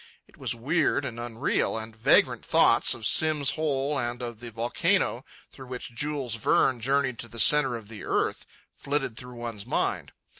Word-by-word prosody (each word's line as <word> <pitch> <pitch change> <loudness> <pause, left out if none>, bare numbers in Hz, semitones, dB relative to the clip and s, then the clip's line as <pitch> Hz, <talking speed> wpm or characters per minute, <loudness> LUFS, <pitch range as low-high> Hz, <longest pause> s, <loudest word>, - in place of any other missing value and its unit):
It - - -22
was - - -3
weird 140 +3 0
and 120 -3 -6
unreal, 120 -1 -1
and 110 0 -7
vagrant 110 - +3
thoughts - - +4
of 110 - -8
Simm's 150 +3 +4
Hole 145 -2 -1
and 120 0 -3
of 120 -2 -6
the 120 0 -7
volcano 115 +2 0 0.3
through 130 - -12
which 125 -1 -7
Jules 140 -1 -2
Verne 120 +2 +2
journeyed 135 -1 0
to 120 - -5
the 115 - -11
centre 150 -1 +5
of 115 -3 -9
the 110 -1 -9
earth - - -1 0.3
flitted 140 -4 -2
through 125 +1 -9
one's 115 -3 -7
mind. - - -1
120 Hz, 175 wpm, -26 LUFS, 115-140 Hz, 0.3 s, centre